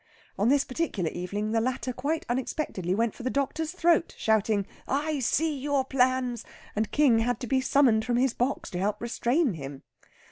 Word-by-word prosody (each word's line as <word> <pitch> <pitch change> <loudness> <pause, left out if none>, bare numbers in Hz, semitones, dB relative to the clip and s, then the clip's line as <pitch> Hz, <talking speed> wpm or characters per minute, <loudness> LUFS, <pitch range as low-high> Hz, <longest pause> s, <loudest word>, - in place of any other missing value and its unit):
On 210 +4 +2
this 280 0 +4
particular 255 - -2
evening 205 +4 -3
the 225 0 +2
latter 255 +1 -2
quite 295 +6 -2
unexpectedly 240 - -2
went 230 0 +1
for - - -11
the 255 - -1
doctor's 290 +4 -1
throat, 340 -2 +2
shouting, 215 -2 +2 0.2
"I 295 +2 0
see 305 +5 +1
your 280 -1 0
plans!" 255 -2 +1 0.3
and 215 0 0
King 275 -7 +4
had 240 0 0
to - - -3
be 260 +2 +1
summoned 260 -5 +3
from 240 0 0
his 255 -1 +2
box 255 +3 -2
to 180 - -3
help 200 +2 -1
restrain 240 - +1
him. 140 -3 -8
250 Hz, 180 wpm, -27 LUFS, 220-280 Hz, 0.3 s, this